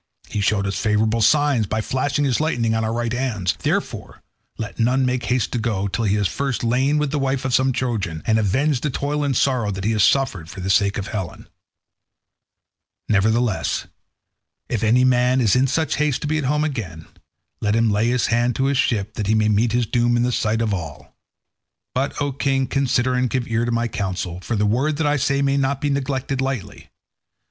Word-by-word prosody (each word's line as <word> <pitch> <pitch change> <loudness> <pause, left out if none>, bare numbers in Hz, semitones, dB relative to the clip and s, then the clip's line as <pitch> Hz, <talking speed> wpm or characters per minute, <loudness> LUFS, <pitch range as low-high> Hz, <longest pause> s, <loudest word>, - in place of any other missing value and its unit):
He 105 - -2
showed 100 -1 +1
us 100 - -2
favourable 110 +1 +1
signs 140 -1 +3
by 110 +2 -1
flashing 135 +5 -1
his 130 -4 +1
lightning 120 -8 0
on 110 0 0
our 110 - -1
right 120 0 -2
hands; 110 -9 -1
therefore - - -3 0.3
let 110 +1 -6
none 130 +3 +2
make 125 -1 -1
haste 125 -3 0
to 120 - -1
go 105 -4 -1
till 100 +4 -2
he 100 0 +2
has 105 -2 +1
first 135 +7 -3
lain 130 +5 +2
with 150 -2 0
the 150 - -1
wife 135 0 -1
of 130 - -1
some 130 +1 +3
Trojan, 110 -11 -3
and 110 -1 +2
avenged 130 +6 +1
the 150 - -1
toil 145 +2 -2
and 135 -4 0
sorrow 125 -6 +1
that 95 -1 -4
he 110 - +1
has 110 -2 +1
suffered 100 - +1
for 95 - -9
the 95 +1 -1
sake 100 +1 +2
of 100 0 -4
Helen. 95 -7 -6 1.6
Nevertheless, 110 +1 +1 0.8
if 115 -3 -1
any 120 +3 +4
man 125 0 +3
is 110 -6 +3
in 130 +1 +3
such 155 +2 0
haste 150 -3 0
to - - -3
be 155 +1 0
at 145 - -3
home 150 +3 +1
again, 95 - -4 0.6
let 105 0 +1
him 115 -1 +2
lay 105 +3 +1
his 125 0 +1
hand 120 +1 +1
to 130 - 0
his 140 0 +1
ship 105 -2 0
that 105 - -3
he 110 - +2
may 110 0 +2
meet 110 +2 +2
his 120 +1 +1
doom 120 +2 +1
in 120 - +2
the 125 - +1
sight 115 -1 0
of 110 -3 0
all. 80 -6 -7 0.8
But, 135 +2 -2
O 145 -1 0
king, 135 0 0
consider 130 -2 +1
and 125 0 +1
give 125 -1 -2
ear 115 0 0
to 120 - -1
my 115 0 0
counsel, 95 -4 -4
for 115 +5 -3
the 105 0 +1
word 135 +8 +1
that 160 - 0
I 145 0 +2
say 140 0 +1
may 140 0 +1
not 140 0 0
be 145 0 -1
neglected 135 -1 -2
lightly. 135 -6 -4
120 Hz, 215 wpm, -21 LUFS, 105-135 Hz, 1.6 s, any